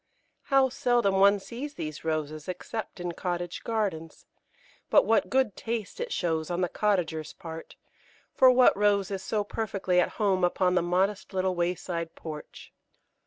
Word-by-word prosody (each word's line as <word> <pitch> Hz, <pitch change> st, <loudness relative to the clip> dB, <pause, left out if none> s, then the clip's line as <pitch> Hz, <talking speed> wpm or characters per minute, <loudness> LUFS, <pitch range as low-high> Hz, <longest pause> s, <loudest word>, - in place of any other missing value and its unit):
How 270 Hz, -1 st, +4 dB
seldom 240 Hz, -6 st, +1 dB
one 200 Hz, +1 st, +6 dB
sees 265 Hz, +8 st, -7 dB
these 155 Hz, -1 st, -6 dB
Roses 155 Hz, -1 st, -3 dB
except 200 Hz, +3 st, -5 dB
in 175 Hz, 0 st, -3 dB
cottage 175 Hz, 0 st, -4 dB
gardens; 195 Hz, -8 st, -3 dB, 0.6 s
but -, -, +5 dB
what 225 Hz, -, +2 dB
good 260 Hz, -6 st, +1 dB
taste 225 Hz, -3 st, -4 dB
it 480 Hz, 0 st, -4 dB
shows 160 Hz, -2 st, -1 dB
on 175 Hz, +1 st, -1 dB
the 180 Hz, -, +1 dB
cottager's 170 Hz, -7 st, -1 dB
part, 165 Hz, -3 st, -9 dB, 0.6 s
for 260 Hz, -, +6 dB
what 255 Hz, 0 st, +6 dB
Rose 205 Hz, -1 st, +2 dB
is 195 Hz, -1 st, -3 dB
so 210 Hz, +1 st, -1 dB
perfectly 195 Hz, -4 st, -1 dB
at 180 Hz, -, +1 dB
home 195 Hz, -4 st, +1 dB
upon 180 Hz, +1 st, +2 dB
the 180 Hz, -, +3 dB
modest 190 Hz, +3 st, 0 dB
little 185 Hz, 0 st, +1 dB
wayside 175 Hz, -1 st, -2 dB
porch? 155 Hz, -2 st, -9 dB
185 Hz, 155 wpm, -28 LUFS, 175-215 Hz, 0.6 s, one